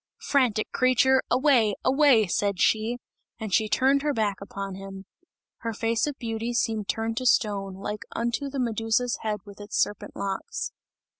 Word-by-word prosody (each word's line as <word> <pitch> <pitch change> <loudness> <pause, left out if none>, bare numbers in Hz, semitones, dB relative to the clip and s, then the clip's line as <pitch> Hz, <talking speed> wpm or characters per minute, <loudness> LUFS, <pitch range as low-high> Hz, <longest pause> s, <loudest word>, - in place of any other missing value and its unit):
"Frantic 250 -7 +1
creature! 255 +1 +4
Away, 245 -5 +3
away!" 265 -4 +5
said 200 +1 -1
she, 220 +5 +2 0.4
as 215 -4 -5
she 220 0 +3
turned 270 +4 +3
her 295 0 0
back 205 -3 -1
upon 195 0 -6
him. 195 0 -9 0.5
Her 230 -1 -4
face 225 +3 0
of 290 -2 -4
beauty 230 0 -3
seemed 220 -3 0
turned 225 0 -2
to 255 0 0
stone, 200 -4 +1
like 210 +2 -5
unto 235 +4 -1
the 275 0 -4
Medusa's 225 0 0
head 210 -2 -2
with 205 0 -12
its 205 - -4
serpent 205 - -1
locks. 195 -1 -3
225 Hz, 160 wpm, -26 LUFS, 205-250 Hz, 0.5 s, away